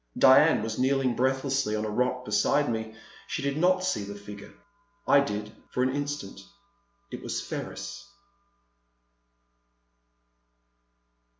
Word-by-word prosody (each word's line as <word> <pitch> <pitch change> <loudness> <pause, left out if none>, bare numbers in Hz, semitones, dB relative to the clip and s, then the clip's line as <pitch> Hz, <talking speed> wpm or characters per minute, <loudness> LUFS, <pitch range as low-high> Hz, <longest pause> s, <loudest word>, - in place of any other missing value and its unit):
Diane - - +6
was 110 +1 -4
kneeling 130 -1 +2
breathlessly 130 -3 0
on 110 0 -2
a - - -2
rock 125 +2 0
beside 140 +7 +2
me; 110 -1 -3 0.3
she - - -3
did 140 0 -1
not 185 +3 +2
see 185 - -1
the 100 0 -7
figure. 100 0 -10 0.6
I 140 - +6
did, 105 -6 -3 0.2
for 125 - 0
an 130 +1 0
instant. 145 0 -4 0.7
It - - -6
was - - -3
Ferris. 200 - -6
125 Hz, 120 wpm, -27 LUFS, 110-140 Hz, 0.7 s, Diane